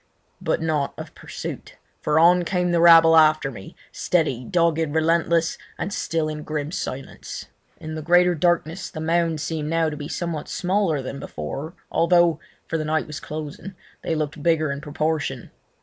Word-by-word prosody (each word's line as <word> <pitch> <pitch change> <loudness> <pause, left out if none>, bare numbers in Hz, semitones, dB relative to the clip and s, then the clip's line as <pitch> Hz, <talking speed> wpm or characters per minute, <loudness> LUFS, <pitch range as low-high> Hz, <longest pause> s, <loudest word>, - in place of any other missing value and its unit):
But - - -1
not 150 -3 -1
of - - -8
pursuit, - - -8 0.3
for 150 0 +1
on 175 +2 +6
came 180 0 0
the 170 -1 +2
rabble 165 -1 +8
after 155 -3 +4
me, 95 -6 -11 0.2
steady, 155 -8 0
dogged, 165 +3 +1 0.2
relentless, 165 +1 +2 0.2
and 200 - -3
still 165 -5 -1
in 155 0 -4
grim 150 0 -4
silence. 135 -6 -6 0.3
In 155 0 -7
the 155 - -4
greater 175 +3 +4
darkness 175 +1 0
the 160 - -8
mounds 165 -1 0
seemed 155 -2 -3
now 165 -1 +1
to - - -5
be 145 -1 -6
somewhat 170 -2 -4
smaller 180 -6 0
than 140 +2 -6
before, 140 - -6 0.2
although—for 170 -1 +1
the 155 - -2
night 155 +1 0
was 150 -1 -7
closing—they 155 +3 -7
looked 150 -1 -3
bigger 155 -2 +2
in 140 0 -5
proportion. 150 -4 -2
160 Hz, 160 wpm, -23 LUFS, 150-170 Hz, 0.3 s, rabble